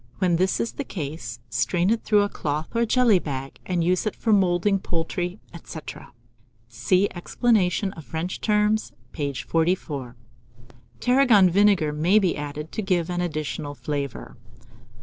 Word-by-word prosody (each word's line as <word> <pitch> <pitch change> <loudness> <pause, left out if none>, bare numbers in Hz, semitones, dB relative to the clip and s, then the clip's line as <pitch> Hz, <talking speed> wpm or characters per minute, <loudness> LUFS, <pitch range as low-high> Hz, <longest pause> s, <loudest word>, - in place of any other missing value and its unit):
When 180 -3 +2
this 185 +2 +1
is 230 - -1
the 285 - -5
case, 140 - -6
strain 175 - +1
it 230 - 0
through 210 -2 +4
a - - +1
cloth 155 -1 -4
or 235 0 +2
jelly 235 -5 +4
bag, 135 -4 -6
and 180 -2 0
use 180 +4 +1
it 215 - -2
for 225 - +1
moulding 195 0 +3
poultry, 175 +2 -3
etc. 165 -2 -9 0.6
(See 125 - +1
Explanation 195 0 +1
of 160 - -10
French 165 +5 -4
Terms, 210 0 +1 0.2
page 140 -3 -3
44.) 160 -7 -1 0.8
Tarragon 245 -8 +5
vinegar 190 -5 +3
may 170 +7 +3
be 190 -5 +2
added 150 +1 -6
to - - -3
give 180 -3 0
an 175 0 -1
additional 155 -3 -3
flavour. 140 +1 -5
175 Hz, 150 wpm, -24 LUFS, 150-205 Hz, 0.8 s, Tarragon